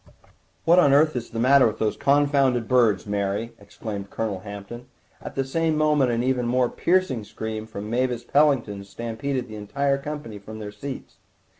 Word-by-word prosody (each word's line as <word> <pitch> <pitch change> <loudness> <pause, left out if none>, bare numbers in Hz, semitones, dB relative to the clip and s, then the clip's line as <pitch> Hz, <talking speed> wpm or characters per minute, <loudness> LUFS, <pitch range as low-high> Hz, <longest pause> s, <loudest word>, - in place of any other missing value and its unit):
"What 170 +2 +6
on 145 -6 +5
earth 155 +1 +4
is 120 -1 -4
the 115 - -7
matter 130 +2 +5
with 110 0 -3
those 110 -1 0
confounded 140 -4 +2
birds, 115 -7 +3
Mary?" 100 +2 -2
exclaimed 100 0 -7
Colonel 110 -4 -3
Hampton; 100 +4 -9 0.3
at - - -8
the 135 - +1
same 160 +3 0
moment 150 -4 +3
an 120 0 0
even 125 -2 0
more 125 0 +2
piercing 175 - +1
scream 110 +1 -6
from 105 -1 -7
Mavis 120 +1 -1
Pellington 125 -8 +2
stampeded 120 +5 -4
the 110 -1 -8
entire 140 +7 -1
company 140 -7 -6
from 110 +2 -10
their 105 -1 -6
seats. 130 +6 -8
120 Hz, 170 wpm, -24 LUFS, 110-140 Hz, 0.3 s, What